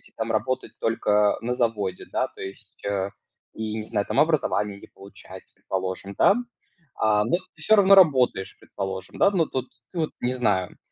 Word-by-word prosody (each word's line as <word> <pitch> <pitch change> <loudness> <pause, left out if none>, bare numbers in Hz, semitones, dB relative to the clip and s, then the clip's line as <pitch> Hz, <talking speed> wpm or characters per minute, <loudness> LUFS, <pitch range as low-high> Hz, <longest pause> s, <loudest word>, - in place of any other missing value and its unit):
там - - -2
работать 130 +2 -1
только 105 -2 +2
на 125 +1 -2
заводе, 105 -6 -1
да, - - 0
то - - -14
есть, 95 +2 -10
э, 100 -1 -1 0.4
и 110 -1 -4
не 105 - -6
знаю 100 -2 -1
там, - - 0
образование 105 -10 +1
не - - -13
получать, 100 +1 -13
предположим, 95 +1 -4
да. 200 - +5 0.6
А, 105 -1 +2
но 150 +9 +2 0.2
ты 155 - -16
всё 220 +7 +5
равно 200 -1 +7
работаешь, 130 - +4
предположим, 95 -1 -6
да, 200 - +4
но 175 -5 +2
тут 130 -1 -4 0.2
ты 180 - -9
вот, 155 - 0
не 125 +1 0
знаю. 105 -8 0
110 Hz, 175 wpm, -25 LUFS, 100-130 Hz, 0.6 s, равно